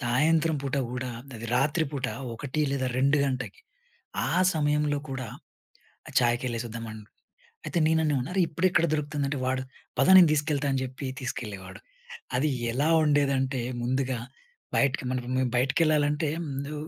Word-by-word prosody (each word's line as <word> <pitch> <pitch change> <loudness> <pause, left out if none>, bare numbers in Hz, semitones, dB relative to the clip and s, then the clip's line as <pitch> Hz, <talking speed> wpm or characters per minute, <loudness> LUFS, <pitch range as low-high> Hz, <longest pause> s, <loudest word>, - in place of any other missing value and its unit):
సాయంత్రం 155 +6 +2
పూట 140 0 -2 0.2
కూడా 125 0 -3 0.3
అది 115 +1 -7
రాత్రి 150 +5 +2
పూట 130 -3 -2 0.3
1 140 +4 -3
లేదా 130 -2 0
2 140 +2 +3
గంటకి 130 - -3 0.7
ఆ - - -2 0.2
సమయంలో 150 -1 +1
కూడా 130 -3 -4 0.8
ఆహ్, - - -14
చాయకి 120 +1 +1
ఎళ్లేసొద్దాం 115 0 -4
అన్ 110 - -9 0.7
అయితే 175 - -1
నేను 160 0 +3
అన్నాను, 140 -5 +1
"అరే! 190 - +1
ఇప్పుడు 165 +4 +1
ఎక్కడ 170 - +3
దొరుకుతుందంటే," 145 -2 -1
వాడు, 130 0 0 0.4
"పద - - +4
నేను 175 -4 +9
తీసుకెళ్తా" 150 -1 0
అని 135 -1 0
చెప్పి 130 +2 -6
తీసుకెళ్లేవాడు. 105 -7 -6 0.6
అది 150 +4 +2 0.2
ఎలా 145 +6 +1 0.2
ఉండేదంటే, 135 -3 +2 0.2
ముందుగా 130 0 0 0.6
బయటకి 140 -1 +2
మనం 130 -1 0
ఇప్ 125 - -3
మేము 130 -1 +1
బయటకెళ్ళాలంటే, 150 +2 +2 0.2
ముందు 140 +2 -4
140 Hz, 145 wpm, -27 LUFS, 130-150 Hz, 0.8 s, నేను